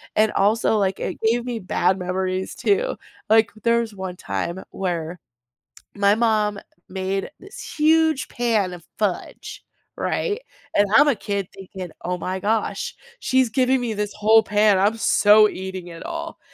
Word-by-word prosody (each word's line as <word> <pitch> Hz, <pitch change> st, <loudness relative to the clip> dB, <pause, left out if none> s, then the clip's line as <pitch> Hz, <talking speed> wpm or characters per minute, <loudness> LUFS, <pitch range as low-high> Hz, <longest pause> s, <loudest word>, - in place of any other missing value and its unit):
And 215 Hz, 0 st, +3 dB
also, 215 Hz, +2 st, +2 dB
like, 195 Hz, -2 st, 0 dB
it -, -, -4 dB
gave 230 Hz, +2 st, +2 dB
me 240 Hz, -2 st, -3 dB
bad 185 Hz, 0 st, 0 dB
memories 185 Hz, +1 st, -2 dB
too. 465 Hz, +5 st, +1 dB, 0.3 s
Like, 220 Hz, -1 st, +4 dB
there's 230 Hz, -2 st, +1 dB
one 190 Hz, -1 st, -5 dB
time 180 Hz, +1 st, -4 dB
where 175 Hz, -2 st, -3 dB, 0.8 s
my 200 Hz, 0 st, +3 dB
mom 215 Hz, -3 st, +1 dB, 0.3 s
made 190 Hz, +2 st, -3 dB
this 395 Hz, +2 st, -10 dB
huge 315 Hz, -2 st, +3 dB
pan 220 Hz, -6 st, 0 dB
of 170 Hz, -2 st, -11 dB
fudge, 200 Hz, -4 st, -3 dB, 0.3 s
right? 435 Hz, +1 st, -1 dB, 0.3 s
And 205 Hz, 0 st, +4 dB
I'm 295 Hz, +1 st, +7 dB
a 285 Hz, -, +4 dB
kid 200 Hz, -2 st, -3 dB
thinking, 190 Hz, -2 st, -9 dB
"Oh 180 Hz, +1 st, -2 dB
my 185 Hz, +2 st, -3 dB
gosh, 215 Hz, +3 st, -1 dB, 0.2 s
she's 260 Hz, -2 st, +2 dB
giving 260 Hz, +2 st, +2 dB
me 230 Hz, -2 st, -2 dB
this 210 Hz, 0 st, -3 dB
whole 215 Hz, +1 st, +5 dB
pan. 205 Hz, -2 st, +3 dB
I'm 210 Hz, +3 st, +2 dB
so 210 Hz, -1 st, +5 dB
eating 190 Hz, -1 st, -6 dB
it 165 Hz, -1 st, -10 dB
all." 330 Hz, -1 st, -6 dB
210 Hz, 150 wpm, -22 LUFS, 190-235 Hz, 0.8 s, I'm